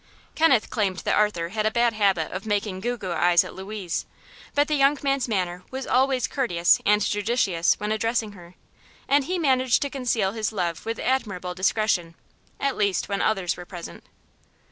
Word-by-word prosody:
Kenneth 275 -9 +3
claimed 200 -5 0
that - - +2
Arthur 190 -6 +1
had 215 +2 -1
a - - +3
bad 235 +1 +2
habit 195 -6 +1
of 190 +4 -6
"making 205 -2 -1
goo 240 +5 -2
goo 190 -5 -5
eyes" 175 +1 +4
at - - -9
Louise; 190 -2 -5 0.5
but 290 0 +3
the 305 - -1
young 280 0 +4
man's 275 -2 +1
manner 180 -5 -2
was 265 0 -5
always 260 -1 +2
courteous 175 -11 +2
and 210 0 +4
judicious 205 -6 +1
when 210 +1 -2
addressing 225 0 0
her, 180 -2 -14 0.5
and 280 0 +3
he 365 +4 -1
managed 260 -6 +2
to 280 - -4
conceal 240 -7 0
his 220 0 -2
love 175 -3 -3
with 225 - -2
admirable 200 -9 -2
discretion 185 -3 0 0.4
at 275 -1 0
least 200 -3 0
when 200 -1 -1
others 190 -5 0
were 175 - -9
present. 175 -3 -9
210 Hz, 180 wpm, -24 LUFS, 185-250 Hz, 0.5 s, eyes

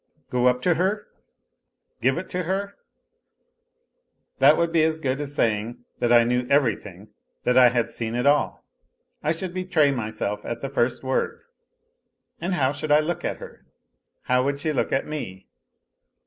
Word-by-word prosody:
Go 125 0 +2
up 125 0 +1
to 180 - +4
her, 190 +6 -1 0.9
give 130 +1 +2
it 185 - -6
her? 190 +3 -2 1.7
That 140 +3 +6
would 170 0 +1
be 165 -1 +3
as 160 0 +1
good 135 -1 -1
as 145 0 -5
saying 115 +1 -1
that 120 - +1
I 120 -1 +7
knew 125 +1 0
everything, 105 -8 0 0.3
that 125 - +2
I 125 -1 +8
had 115 -1 -1
seen 115 0 -3
it 125 +2 -1
all. 145 +1 +2 0.6
I 150 - 0
should 175 +2 -3
betray 180 -6 +2
myself 110 -4 -3
at 120 - -5
the 135 - -4
first 120 -2 0
word. 130 0 -1 1.0
And 180 +2 -1
how 135 -5 +2
should 145 +1 -4
I 150 - +7
look, 165 +3 -2
at - - -2
her? - - -12 0.6
How 125 +1 +2
would 140 +1 -1
she 155 +1 -1
look 130 - -1
at 135 - 0
me. 95 -12 -6
135 Hz, 165 wpm, -24 LUFS, 120-160 Hz, 1.7 s, I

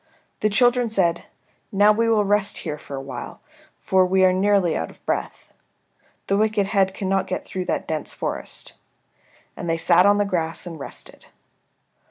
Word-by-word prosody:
The 215 - +2
children 245 +2 +3
said, 175 -5 +1 0.5
"Now 205 +1 +5
we 230 +2 +1
will 215 -2 +3
rest 205 0 +1
here 150 -2 -4
for 140 - -8
a - - -4
while, 130 -3 -8 0.4
for 190 -1 +3
we 190 +1 +3
are 185 - +4
nearly 190 -3 +2
out 80 - -3
of - - -19
breath. - - -4 0.7
The 195 - +1
wicked 215 -1 +2
head 195 -1 +1
cannot 195 -1 -1
get - - -4
through 185 -1 -4
that - - -2
dense 155 -2 -3
forest." - - -4 0.8
And 175 - -5
they 165 - +1
sat 180 +3 +4
on 205 0 +5
the 205 - +2
grass 165 -4 -2
and 165 -3 -8
rested. 140 - -8
190 Hz, 175 wpm, -23 LUFS, 170-205 Hz, 0.8 s, Now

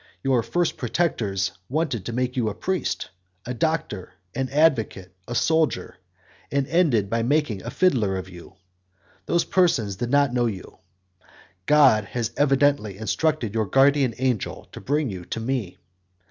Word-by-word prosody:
Your 130 -3 +2
first 175 +7 -1
protectors 110 - -1 0.2
wanted 135 - -1
to - - -3
make 125 +1 -2
you 120 -4 +1
a 105 - -6
priest, 185 - -2 0.3
a 125 - -3
doctor, 125 - -2 0.2
an 130 -1 -2
advocate, 120 - +1
a 120 - -4
soldier, 160 - +1 0.5
and 140 -1 +1
ended 140 - +2
by 115 +3 0
making 125 -5 0
a 115 - -6
fiddler 120 - +1
of 95 0 -6
you; 90 0 -13 0.7
those 170 0 +2
persons 125 - +1
did 120 +4 -3
not 140 -1 +3
know 120 -1 +2
you. 100 -5 -7 0.9
God 135 -9 +5
had 115 +2 -3
evidently 140 -7 +2
instructed 120 +1 -1
your 110 -2 0
guardian 135 +1 +3
angel 125 -5 -2
to - - -9
bring 145 -3 0
you 90 -2 -7
to 115 - -4
me. 115 -5 -3
125 Hz, 150 wpm, -24 LUFS, 110-145 Hz, 0.9 s, God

